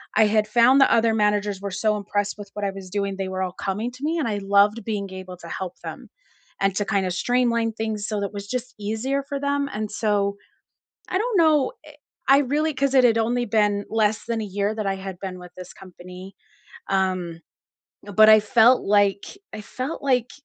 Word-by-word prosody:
I 220 - +5
had 215 0 +2
found 240 +5 +5
the - - +5
other 225 0 +3
managers 210 -2 0
were 200 - -4
so 210 +3 0
impressed 205 0 -2
with 205 -1 -10
what 205 -1 -3
I 195 - -1
was 190 -1 -10
doing, 200 0 -2
they 195 -1 -3
were 190 0 -3
all 185 - -3
coming 205 +6 -3
to 255 +3 -13
me 320 +3 0
and 300 -6 -1
I 210 -2 -1
loved 200 +3 +3
being 200 -3 -3
able 185 -1 -8
to 170 - -11
help 185 -1 -6
them, - - -8 0.5
and 195 0 +2
to 205 - 0
kinda 195 -2 0
streamline 235 +3 +1
things 215 -1 -3
so 210 -2 -2
that 200 0 -4
was 200 0 -7
just 250 +2 -4
easier 220 +7 -2
for 280 -1 -3
them, 280 0 -1
and 210 0 -4
so 205 -2 0 0.7
I 370 - 0
don't 445 +1 0
know 305 -5 +3
I 300 -1 -14 0.3
I 275 - +8
really 295 +3 0
'cause 275 0 0
it 260 -2 +5
had 230 -2 +4
only 240 +2 0
been 205 -2 +1
less 215 -1 0
than 230 -1 -2
a - - -3
year 205 +2 -2
that 215 -1 -3
I 195 - 0
had 190 -1 -7
been 185 -2 -6
with 180 -1 -12
this 180 0 -9
company. 185 0 -12 0.5
Um, 185 -3 -1 0.6
but 215 +1 +4
I 215 0 +8
felt 230 +4 +4
like 200 -1 +2 0.3
I 220 - -6
felt 255 +8 -6
like 250 -3 +1
210 Hz, 210 wpm, -23 LUFS, 195-240 Hz, 0.7 s, I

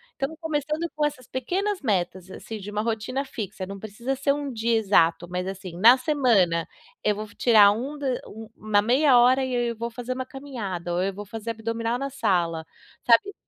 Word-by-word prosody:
Então, 275 +4 -3
começando 310 0 -2
com 300 0 +1
essas 255 -4 -4
pequenas 375 +10 -2
metas, 185 -5 -1
assim, 220 +3 -7
de 200 +1 -8
uma 210 +1 -1
rotina 230 +4 -2
fixa. 205 -7 -6
Não 195 +1 -8
precisa 225 +6 -4
ser 275 +1 +1
um 285 -1 -4
dia 230 0 0
exato. 175 -5 +3
Mas, 180 +1 -3
assim, 190 -2 -7
na 235 +7 +8
semana, 230 - +2 0.4
eu 210 - +2
vou 215 +1 -5
fi 205 - -19
tirar 215 -4 +6
um 260 +8 -4
d 265 -4 -1
um 220 +1 -10
uma 210 -1 +2
meia 255 +3 +4
hora 255 +2 +5
e 260 - -4
eu 240 -1 0
vou 235 +1 -4
fazer 245 +2 -4
uma 260 0 -4
caminhada, 230 -11 -5
ou 175 - +1
eu 195 +1 -1
vou 205 +2 -8
fazer 225 +2 -5
abdominal 230 +1 -2
na 275 +1 -3
sala, 175 -11 0 0.4
sabe. 245 +13 +4
230 Hz, 200 wpm, -25 LUFS, 200-265 Hz, 0.4 s, na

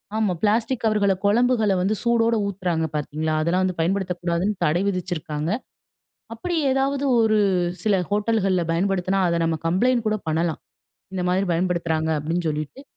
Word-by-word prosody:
ஆமா 215 -4 +1
பிளாஸ்டிக் 220 +4 +1
கவர்கள 210 -3 +2
குழம்புகள 220 -1 +3
வந்து 200 +4 +1
சூடோட 235 -1 +2
ஊத்துறாங்க 180 -5 -1
பாத்தீங்களா, 155 +1 -2
அதெல்லாம் 175 +4 +1
வந்து 185 -1 -1
பயன்படுத்தக்கூடாதுன்னு 180 +1 -1
தடை 160 +4 +2
விதிச்சிருக்காங்க. 170 -5 -3 0.8
அப்பிடி 335 +10 -3
ஏதாவது 270 +1 0 0.2
ஒரு 220 -1 +3 0.4
சில 215 -2 +2 0.2
ஹோட்டல்கள்ல 205 -3 +1
பயன்படுத்துனா, 190 +2 0
அத 170 - +1
நம்ம 165 -1 0
கம்ப்ளைண்ட் 235 +8 +2
கூட 215 - +2
பண்ணலாம். 160 0 -1 0.5
"இந்த 185 - -2
மாரி 185 +2 +2
பயன்படுத்துறாங்க" 165 -2 0
அப்பிடின்னு 165 +3 -2
சொல்லிட்டு, 155 - -5
185 Hz, 135 wpm, -23 LUFS, 170-220 Hz, 0.8 s, குழம்புகள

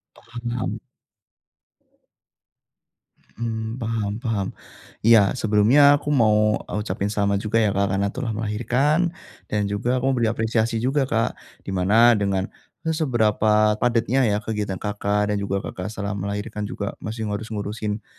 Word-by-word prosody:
Paham. 120 0 -5 2.6
Mmm, 115 +1 -3
paham 110 -3 -2
paham. 105 -5 -1 0.6
Iya 110 -4 +6
sebelumnya 110 +6 +4 0.2
aku 145 - -7
mau, 105 -1 +3
e - - -8
ucapin 105 -1 -2
selamat 100 -1 +1
juga 105 +2 -1
ya 105 - +2
Kak 100 0 +2
karena 100 +1 +1
telah 130 -2 -4
melahirkan, 125 +10 +1 0.4
dan 105 -1 0
juga 100 +4 -2
aku 125 - -2
mau 130 - -1
beri 115 - +2
apresiasi 110 0 0
juga 135 0 +1
Kak, 115 0 +1 0.3
di 95 - -5
mana 105 +6 +5
dengan 95 -2 0 0.4
e 160 - -2
seberapa 110 -7 +2
padatnya 120 +2 +2
ya 105 - +1
kegiatan 105 -3 -3
Kakak, 105 +1 -1
dan 105 - 0
juga 100 0 -2
Kakak 90 +2 -5
setelah 105 -1 -4
melahirkan 105 +1 -4
juga 100 - -4
masih 110 +1 -5
harus 110 +2 -4
ngurusin 105 0 -4
110 Hz, 140 wpm, -23 LUFS, 105-115 Hz, 2.6 s, Iya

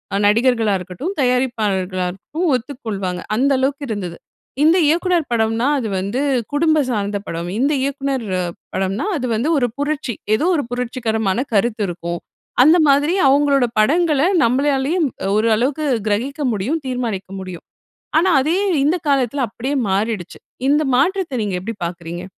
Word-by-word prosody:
அ - - +2
நடிகர்களா 225 0 +3
இருக்கட்டும், 185 - -5
தயாரிப்பாளர்களா 215 -8 0
இருக்கட்டும் 305 - -4
ஒத்துக்கொள்வாங்க. 220 -8 -4
அந்த 275 +4 +2
அளவுக்கு 275 +2 -1
இருந்தது. 185 -6 -4 0.5
இந்த 325 +4 +5
இயக்குனர் 345 0 +1
படம்னா 225 +2 +1
அது 225 - -3
வந்து 200 +8 -2 0.3
குடும்பம் 310 -2 +2
சார்ந்த 205 -2 -1
படம். 170 +1 -4
இந்த 280 +4 +2
இயக்குனர் 275 -3 -2 0.5
படம்னா 195 - -1
அது 250 - -3
வந்து 255 +9 0
ஒரு 245 -3 +2
புரட்சி, 290 -5 -2 0.2
ஏதோ 300 - 0
ஒரு 290 - 0
புரட்சிகரமான 230 -4 -1
கருத்து 215 +1 +1
இருக்கும். 170 0 -4 0.4
அந்த 315 +6 +6
மாதிரி 290 +4 +3 0.2
அவங்களோட 280 -2 +3
படங்கள 305 +4 +3 0.2
நம்மளாலேயே 275 +5 +1
ம் 260 - -2 0.2
ஓரளவுக்கு 235 +8 +1 0.2
கிரகிக்க 255 +8 -1
முடியும், 255 +11 -2
தீர்மானிக்க 230 -7 -3
முடியும். 185 -2 -8 0.5
ஆனா 365 +3 +3
அதே 325 +6 +1 0.3
இந்த 310 +5 +2
காலத்தில 270 -1 +1
அப்படியே 260 +6 -3
மாறிடுச்சு. 200 -1 -2 0.3
இந்த 295 +2 +3
மாற்றத்தை 340 0 +1
நீங்க 195 -3 -2
எப்படி 225 +2 -5
பாக்குறீங்க? 170 +1 -6
245 Hz, 135 wpm, -19 LUFS, 205-285 Hz, 0.5 s, அந்த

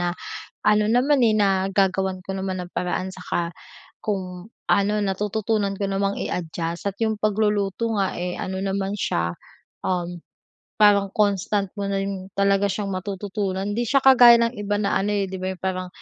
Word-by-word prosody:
na 175 - 0 0.5
ano 210 0 +3
naman, 250 +4 +3
eh, 220 - +4
nagagawan 190 -2 +1
ko 190 +1 -5
naman 190 -1 -3
ng 175 - -9
paraan, 180 +1 -1
saka 180 -2 -3 0.5
kung 185 -2 -4 0.2
ano, 200 +1 +3
natututunan 205 +1 -1
ko 200 - -2
namang 195 +1 0
i-adjust 170 +1 -3
at 200 - -6
yung 220 -1 +1
pagluluto 210 +1 0
nga, 195 -1 0
eh, 180 0 -3
ano 190 0 -3
naman 195 0 -1
siya, 85 - -1 0.5
uhm, 175 -1 -2 0.6
parang 200 -2 +5
constant 205 -1 +1
mo 200 -1 -3
na 195 - 0
rin 195 -1 -4
talaga 200 0 +3
siyang 200 +1 -3
matututunan. 195 +1 -3
Di 235 - 0
siya 275 +4 +3
kagaya 245 -3 +8
ng 235 +1 +1
iba 205 -2 -2
na 205 -1 0
ano, 205 +2 0
eh, 200 -1 0
di 190 - -8
ba, 185 - -1
yung 180 - -16
parang 185 -1 -2
195 Hz, 170 wpm, -23 LUFS, 185-210 Hz, 0.6 s, kagaya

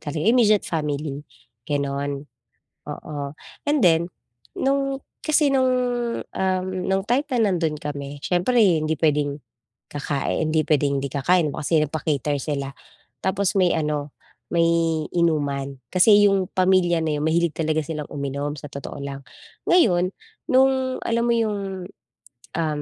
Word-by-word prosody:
talaga, 150 +1 -4
immediate 220 -2 +4
family, 150 -2 -3 0.5
gano'n, 140 0 -1 0.7
oo. 150 -2 -6 0.5
And 295 0 +3
then 170 -1 +4 0.5
nung, 275 0 0 0.2
kasi 300 -2 +3
nung, 260 -1 +3 0.6
um, 185 -1 -1 0.2
nung 190 0 +1
time 265 +6 +1
na 225 -5 +3
nandun 160 -4 0
kami, 145 -1 -5
siyempre 180 +8 +1 0.3
hindi 155 +1 0
pwedeng 145 -2 +1 0.6
kakain 145 +2 -1
hindi 155 -1 +3
pwedeng 140 -2 +2
hindi 140 - -2
kakain 160 +4 +2
ba - - -5
kasi 160 +1 +3
nagpa-cater 150 -1 -1
sila. 140 -3 -3 0.5
Tapos 190 0 +1
may 180 -2 +4
ano, 150 -2 -2 0.4
may 170 -1 +3 0.5
inuman 145 -5 0 0.2
kasi 205 +3 +6
yung 195 -2 +1
pamilya 185 -2 +3
na 150 -1 0
yun 145 - -2
mahilig 165 0 +2
talaga 155 -1 0
silang 150 -1 -5
uminom 140 +1 -3
sa 145 - -8
totoo 140 +1 -7
lang. 140 0 -6 0.5
Ngayon 185 - +4 0.4
nung, 260 0 +3
alam 230 0 +1
mo 240 - +2
yung, 200 -5 -2 0.7
um, 155 -3 -1
160 Hz, 135 wpm, -23 LUFS, 145-195 Hz, 0.7 s, kasi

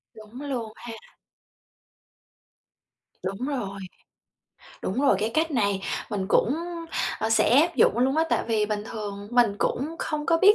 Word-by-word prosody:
Đúng 220 +4 -11
luôn 245 -7 -4
ha. 240 -1 -8 2.3
Đúng 195 +7 -3
rồi. 205 -9 -3 1.0
Đúng 200 +8 -1
rồi, 280 -1 +4
cái 215 +2 0
cách 320 +1 +2
này 200 -8 +1 0.3
mình 195 -3 -2
cũng, 240 +4 +3 0.6
a, 220 - -1
sẽ 240 +4 +5
áp 340 +1 +1
dụng 230 - +4
luôn 265 +3 +2
á, 320 - +4
tại - - +2
vì 220 -2 +1
bình 210 0 -2
thường 205 -3 -6
mình 240 -4 +4
cũng 275 +4 0
không 300 -1 -3
có 330 - +4
biết 405 +4 +7
235 Hz, 155 wpm, -26 LUFS, 210-280 Hz, 2.3 s, biết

